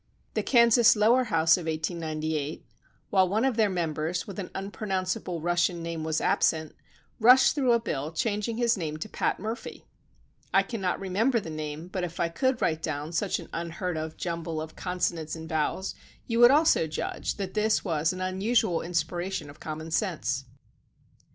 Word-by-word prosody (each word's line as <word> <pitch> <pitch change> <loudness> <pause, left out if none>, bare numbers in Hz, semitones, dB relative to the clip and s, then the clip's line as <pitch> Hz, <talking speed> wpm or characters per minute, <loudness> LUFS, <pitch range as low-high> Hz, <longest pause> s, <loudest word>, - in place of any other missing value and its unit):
The - - 0
Kansas 235 -1 +5
lower 235 +5 +4
house 165 -5 +4
of 170 -2 -6
1898, 155 -2 -3 0.5
while 190 -2 +4
one 220 +6 +1
of 265 -3 +1
their 220 -2 +3
members 165 -1 -2
with 200 -1 -7
an 185 - -5
unpronounce 195 -1 -2
able 170 -3 -5
Russian 175 0 +1
name 165 -1 -4
was 160 0 0
absent, 160 -1 +1 0.4
rushed 250 +3 +7
through 270 -4 +2
a 235 - +4
bill 150 -9 -3
changing 210 +6 -1
his 240 -1 +3
name 155 -5 -4
to 155 - -5
Pat - - -1
Murphy. 220 +3 -6 0.7
I - - +4
cannot 195 -7 -2
remember 215 +6 +1
the 165 -6 -7
name, 155 +1 -5
but 185 0 -4
if 170 -1 -5
I 170 - +1
could 260 +10 0
write 160 0 +1
down 155 0 -3
such 170 - 0
an - - -9
unheard 170 +1 -3
of 155 0 -5
jumble 165 -2 -3
of 160 0 -7
consonants 170 -3 -2
and 160 0 -8
vowels, 160 +4 -1 0.3
you 230 -1 -1
would 240 0 +9
also 290 - +4
judge 155 - -3
that 195 -2 -4
this 215 0 +1
was 160 -2 +1
an 185 0 -6
unusual 185 0 +1
inspi 165 -2 -1 0.2
ration 190 -7 -4
of 145 - -18
common 155 +1 -6
sense. 155 - -1
175 Hz, 175 wpm, -27 LUFS, 160-210 Hz, 0.7 s, would